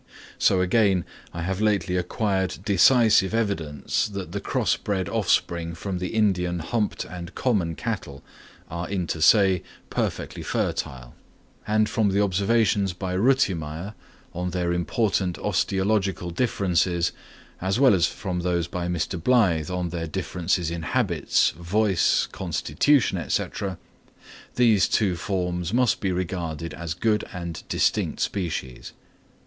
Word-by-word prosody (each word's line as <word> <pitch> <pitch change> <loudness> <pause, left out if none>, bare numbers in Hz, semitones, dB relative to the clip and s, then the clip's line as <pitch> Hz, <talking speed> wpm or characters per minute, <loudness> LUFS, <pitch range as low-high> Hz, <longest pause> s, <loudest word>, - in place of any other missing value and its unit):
So 95 - +4
again 95 -1 +2 0.3
I 85 - -5
have 95 +3 -2
lately 100 -5 +1
acquired 95 +1 -1
decisive 110 +1 +5
evidence 100 - -1
that 100 -5 -6
the - - -4
crossed - - -1
offspring 85 -3 0
from 90 +1 -4
the 90 - -2
Indian 90 -5 +1
humped 105 +6 -2
and 85 -1 -8
common 95 -10 0
cattle 95 - -5 0.4
are 85 +1 -5
inter 90 -4 -2
se 95 +1 +5 0.3
perfectly - - -3
fertile; 60 -2 -3 0.5
and 110 0 +3
from 110 -2 +1
the 100 +1 +1
observations 100 0 +2
by 90 +1 -4
Rütimeyer 95 - +1 0.4
on 90 +1 -2
their 90 -1 -1
important 95 0 0
osteological 95 -3 0
differences, 90 -4 +1 0.5
as 95 +5 0
well 135 -5 +6
as 90 -3 +3
from 90 -4 -4
those 85 -1 0
by 90 -1 -4
Mr. 85 0 -2
Blyth 90 -9 +3
on 90 -1 -2
their 80 -1 -4
differences 85 +1 -1
in 85 0 -4
habits, 85 -2 +1
voice, 95 +3 +1
constitution, 135 - +1
&c., - - +1 1.1
these 115 -5 +4
two 100 -5 +2
forms 90 -1 -2
must 125 +1 +2
be 95 - -1
regarded 85 -3 -3
as 80 -1 -5
good 105 +4 +1
and 85 -3 -6
distinct - - +1
species. 80 -10 -3
90 Hz, 125 wpm, -25 LUFS, 85-105 Hz, 1.1 s, well